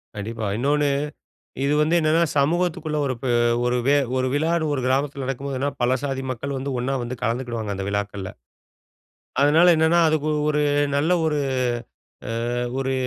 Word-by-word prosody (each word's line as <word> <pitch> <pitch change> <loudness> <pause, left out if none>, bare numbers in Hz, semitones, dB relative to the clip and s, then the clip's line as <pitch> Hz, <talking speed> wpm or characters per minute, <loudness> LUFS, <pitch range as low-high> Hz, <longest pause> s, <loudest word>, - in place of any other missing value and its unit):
கண்டிப்பா. 110 +1 -4
இன்னோனு, 145 +3 +1 0.8
இது 145 +1 +2
வந்து 155 +3 +2
என்னன்னா, 160 +1 +3 0.2
சமூகத்துக்குள்ள 155 0 0
ஒரு 130 - -1
பே 130 - -1 0.3
ஒரு 125 0 +1
வெ 145 +1 +5 0.2
ஒரு 130 0 +1
விழான்னு 160 +2 +1
ஒரு 130 - -1
கிராமத்தில 135 +1 0
நடக்கும்போதுன்னா, 135 +1 -2
பல 125 +2 +3
சாதி 135 -2 -2
மக்கள் 135 +3 -4
வந்து, 140 +2 -4
ஒண்ணா 130 +3 -1
வந்து 120 +1 -4
கலந்துக்கிடுவாங்க, 115 -3 -2
அந்த 95 0 -4
விழாக்கள்ல. 100 -2 -3 1.1
அதனால 155 +5 +5
என்னன்னா, 160 +2 +3
அதுக்கு 155 -1 0 0.2
ஒரு 150 0 +1 0.3
நல்ல 155 +5 +2
ஒரு 150 -1 0 1.2
அ - - -1 0.2
ஒரு 135 0 -1
140 Hz, 145 wpm, -23 LUFS, 125-150 Hz, 1.2 s, வெ